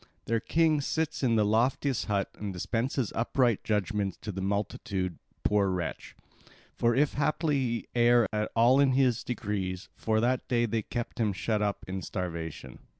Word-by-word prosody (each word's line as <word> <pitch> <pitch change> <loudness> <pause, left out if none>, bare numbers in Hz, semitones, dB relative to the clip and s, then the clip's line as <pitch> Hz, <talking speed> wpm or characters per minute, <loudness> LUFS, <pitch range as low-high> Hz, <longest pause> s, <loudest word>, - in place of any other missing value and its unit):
Their 115 0 +1
king 155 +3 +2
sits 160 +3 -1
in 120 -4 +2
the 105 -1 +3
loftiest 120 +4 +1
hut 100 -2 -1
and 105 -1 -5
dispenses 115 +6 -2
upright 120 0 +1
judgments 105 -2 -1
to 105 - -3
the 95 0 -5
multitude, 95 -2 -2 0.2
poor 100 -2 +3
wretch! 90 -3 -4 0.6
For 120 0 +2
if 145 +2 +2
haply 150 +1 +1
he 120 -3 -2
err 120 -1 +5
at 105 0 0
all 120 +4 +5
in 135 -2 +4
his 130 -3 +2
decrees, 100 -5 -3
for 110 -1 0
that 125 +2 0
day 120 -1 +2
they 115 0 -1
keep 120 +3 -5
him 105 -3 +1
shut 105 +3 -1
up 105 -1 -1
in 95 0 -4
starvation. 85 -9 -5
110 Hz, 165 wpm, -29 LUFS, 100-125 Hz, 0.6 s, err